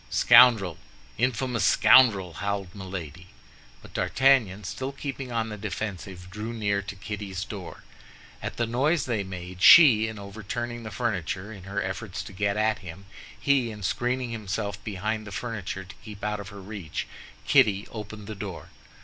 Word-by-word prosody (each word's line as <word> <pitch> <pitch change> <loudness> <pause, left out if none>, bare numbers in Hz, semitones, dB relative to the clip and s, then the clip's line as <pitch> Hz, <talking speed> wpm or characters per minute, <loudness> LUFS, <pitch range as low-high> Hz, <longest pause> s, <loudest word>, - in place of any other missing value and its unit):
"Scoundrel, 110 -9 +6 0.4
infamous 125 -2 0
scoundrel!" 100 -5 +5
howled 100 -1 -3
Milady. 90 -3 -7 0.6
But - - -14
D'Artagnan, 120 -7 +2
still 120 +7 -4
keeping 135 -2 -6
on 115 -1 -1
the 105 -1 -7
defensive, 95 -3 -5
drew 110 +4 -5
near 100 -3 0
to 100 0 -7
Kitty's 100 -2 -5
door. 95 -6 -8 0.6
At - - -5
the 115 - +1
noise 135 +7 +1
they 115 -5 -1
made, 90 -1 -8
she 120 - +8
in 110 -1 -6
overturning 110 +4 -5
the 110 - -7
furniture 100 -2 -3
in 95 -3 -11
her 100 +1 -2
efforts 95 0 -5
to 100 -1 -11
get 100 +1 0
at 110 0 +1
him, 95 +1 -10 0.3
he 135 -4 +2
in 105 -2 -8
screening 125 +5 -1
himself 105 -2 -4
behind 110 +2 -3
the - - -8
furniture 100 -3 -4
to 95 - -13
keep 105 -1 -10
out 105 0 -1
of 100 -1 -7
her 100 -1 -10
reach, 95 -6 -5 0.4
Kitty 100 -1 +4
opened 105 -1 -8
the 110 - -6
door. 100 -3 -7
105 Hz, 160 wpm, -26 LUFS, 95-115 Hz, 0.6 s, she